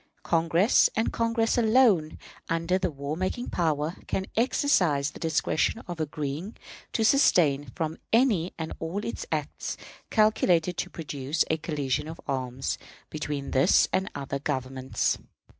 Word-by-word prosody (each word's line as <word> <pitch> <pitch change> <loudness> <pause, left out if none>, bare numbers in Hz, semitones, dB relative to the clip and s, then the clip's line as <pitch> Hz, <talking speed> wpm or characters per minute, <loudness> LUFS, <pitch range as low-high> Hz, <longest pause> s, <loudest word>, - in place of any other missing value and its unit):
Congress, 170 +5 +3
and 225 - 0
Congress 230 0 +1
alone, 220 -9 +4 0.3
under 165 +3 +1
the 185 - 0
war 140 0 -4
making 185 +8 -3
power, 160 -1 0
can 190 - -1
exercise 180 - +2
the - - -12
discretion 160 +6 0
of 175 -2 -6
agreeing 150 +5 -4 0.3
to 225 - 0
abstain 150 - +4
'from 160 -2 -2
any 220 -8 +3
and 160 -1 -4
all 165 +5 -3 0.3
acts - - -3 0.3
calculated 180 -6 +3
to - - -3
produce 145 -1 -2
a 160 - +2
collision 150 -2 -2
of 165 +1 -8
arms' 130 -1 -2 0.3
between 150 -2 -4
this 135 +8 +4
and 190 0 +1
other 140 -1 -3
governments. 130 -2 -1
160 Hz, 130 wpm, -27 LUFS, 145-190 Hz, 0.3 s, alone